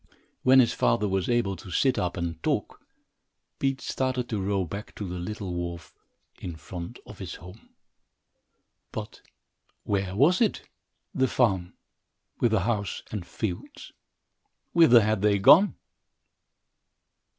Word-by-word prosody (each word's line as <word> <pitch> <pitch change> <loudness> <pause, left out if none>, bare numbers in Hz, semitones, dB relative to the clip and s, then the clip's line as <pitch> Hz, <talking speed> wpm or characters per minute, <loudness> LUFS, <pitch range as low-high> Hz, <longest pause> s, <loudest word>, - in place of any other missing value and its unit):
When 130 +1 +6
his 120 - +4
father 110 -3 +2
was 95 +1 -1
able 120 -5 +1
to 95 - -11
sit 130 +9 +2
up 90 -1 -2
and 85 -2 -4
talk, - - -2 0.8
Pete 135 -1 0
started 130 -2 -2
to 105 -4 -2
row 95 -1 0
back 100 +6 -8
to 105 - -5
the 90 0 -5
little 95 0 -5
wharf 85 -1 -5 0.5
in 85 -3 -6
front 85 +6 -8
of 105 - -12
his 95 -3 -6
home. 90 +6 -13 1.2
But - - -7 0.6
where 95 -2 -1
was 160 - +4
it, 220 - +1 0.5
the 130 0 +2
farm, 95 -10 +1 0.7
with 120 - +3
the 110 -3 +2
house 105 -1 -2
and 105 -4 -4
fields? 95 -6 -5 0.8
Whither 145 -9 +7
had 110 -1 0
they 105 -1 +3
gone? 165 - +6
100 Hz, 135 wpm, -27 LUFS, 90-120 Hz, 1.2 s, Whither